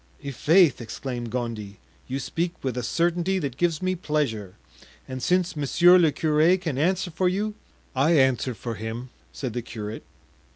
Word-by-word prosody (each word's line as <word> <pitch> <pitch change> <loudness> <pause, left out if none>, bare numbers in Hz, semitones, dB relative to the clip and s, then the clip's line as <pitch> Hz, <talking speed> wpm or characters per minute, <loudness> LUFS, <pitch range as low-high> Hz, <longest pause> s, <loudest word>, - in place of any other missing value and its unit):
"I'faith!" 150 +2 +4
exclaimed 120 +1 -5
Gondy, 110 -4 -4 0.3
"you 130 - -2
speak 170 +6 -2
with 130 -3 -2
a 125 - -1
certainty 175 +8 0
that 140 -8 -3
gives 170 +2 0
me 185 0 +1
pleasure; 140 - -2 0.5
and 130 -1 -6
since 180 +2 +1
monsieur 175 +5 +5
le 165 -3 +4
curé 155 +5 +3
can 160 -7 -3
answer 180 +3 +1
for 180 +3 +1
you——" 210 +3 -1 0.4
"I 155 +5 +4
answer 130 -2 +2
for 115 +3 -5
him," 115 +4 -6 0.2
said 130 -5 -5
the 120 - -2
curate. 110 -2 -6
140 Hz, 160 wpm, -25 LUFS, 120-175 Hz, 0.5 s, monsieur